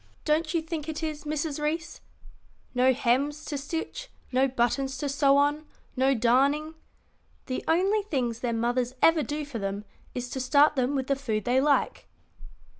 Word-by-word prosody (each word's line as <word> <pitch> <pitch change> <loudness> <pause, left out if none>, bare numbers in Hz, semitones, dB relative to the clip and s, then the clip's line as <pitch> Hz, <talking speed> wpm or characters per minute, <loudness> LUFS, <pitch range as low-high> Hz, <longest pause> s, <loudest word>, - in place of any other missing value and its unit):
Don't 310 +2 +1
you 325 - +1
think 320 -1 -5
it 315 +1 -4
is, 305 -1 -4
Mrs. 300 0 -2
Reece? 315 +2 -3 0.7
no 255 +1 +4
hems 275 +4 0
to 295 - -4
stitch, 330 - -5 0.2
no 260 +1 +3
buttons 265 +2 0
to 285 - -2
sew 280 0 +3
on, 290 +2 +1 0.3
no 265 +1 +3
darning. 275 +7 +2 0.7
The 255 - -3
only 385 +6 +3
things 255 - -2
their 245 -1 -1
mothers 240 +2 -1
ever 325 -1 +6
do 295 +1 -3
for 270 -5 -6
them 200 +1 -4 0.3
is 245 0 -3
to 265 - -3
start 285 +4 +4
them 260 +1 0
with 265 -1 -1
the 275 - +1
food 225 -6 -3
they 255 +2 +3
like. 295 - +1
280 Hz, 170 wpm, -27 LUFS, 255-305 Hz, 0.7 s, ever